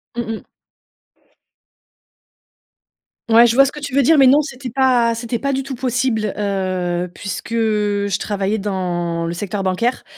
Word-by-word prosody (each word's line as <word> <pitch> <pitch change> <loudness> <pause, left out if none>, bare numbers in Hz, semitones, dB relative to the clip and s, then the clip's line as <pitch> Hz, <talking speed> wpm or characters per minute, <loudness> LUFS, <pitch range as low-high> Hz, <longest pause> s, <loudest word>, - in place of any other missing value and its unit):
Mmh 235 -1 -3
mh. 220 - -6 2.9
Ouais, 230 +1 +7
je 235 - +3
vois 275 +2 +6
ce 275 - -2
que 300 - -9
tu 285 -2 -6
veux 280 - +4
dire, 315 +4 +4
mais 270 - +6
non, 280 +4 +6
c'était 255 -4 -7
pas 250 -3 +3
c'était 235 +1 -3
pas 275 +3 -2
du 270 - -1
tout 270 0 -6
possible, 240 -4 -1
heu, 185 -3 -2
puisque 200 +3 -6
je 205 -3 0
travaillais 205 +1 -2
dans 175 -4 -2
le 170 - -3
secteur 200 +2 -4
bancaire, 190 +7 -1
220 Hz, 160 wpm, -19 LUFS, 195-255 Hz, 2.9 s, Ouais